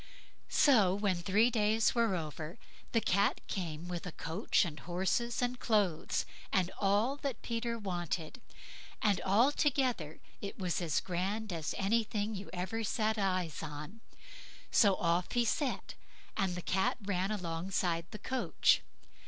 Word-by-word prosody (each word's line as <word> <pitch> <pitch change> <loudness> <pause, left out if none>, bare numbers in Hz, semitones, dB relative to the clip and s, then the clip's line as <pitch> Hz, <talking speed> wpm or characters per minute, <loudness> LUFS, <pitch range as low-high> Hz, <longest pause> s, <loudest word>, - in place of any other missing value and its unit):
So 210 -10 +5
when 200 -3 +1
three 205 +7 +3
days 220 0 +3
were 230 -5 +2
over, 155 +2 -5 0.3
the 230 - +2
Cat 200 0 +2
came 170 -3 -4
with 175 0 -4
a - - -4
coach 165 +6 +1
and 155 -3 -6
horses, 190 - -1
and 245 0 -1
clothes, 200 -8 +1 0.3
and 185 -1 +2
all 210 +7 +2
that 280 -3 -4
Peter 235 0 -2
wanted, 175 - -3 0.6
and 205 -4 +3
altogether 245 - +2 0.2
it 200 - -5
was 180 -2 -1
as 160 -4 +1
grand 195 +3 -2
as 160 -2 -3
anything 215 +1 0
you 195 -1 -6
ever 190 +5 -3
set 220 0 0
eyes 185 -6 0
on; 155 +8 -7 0.7
so 200 -3 +5
off 170 0 0
he 240 -1 +3
set, 275 +3 -1 0.4
and 190 -4 0
the 180 - -5
Cat 195 +7 +1
ran 195 -1 0
alongside 175 -2 -1
the 215 - -7
coach. 260 +4 +2
195 Hz, 140 wpm, -33 LUFS, 175-225 Hz, 0.7 s, So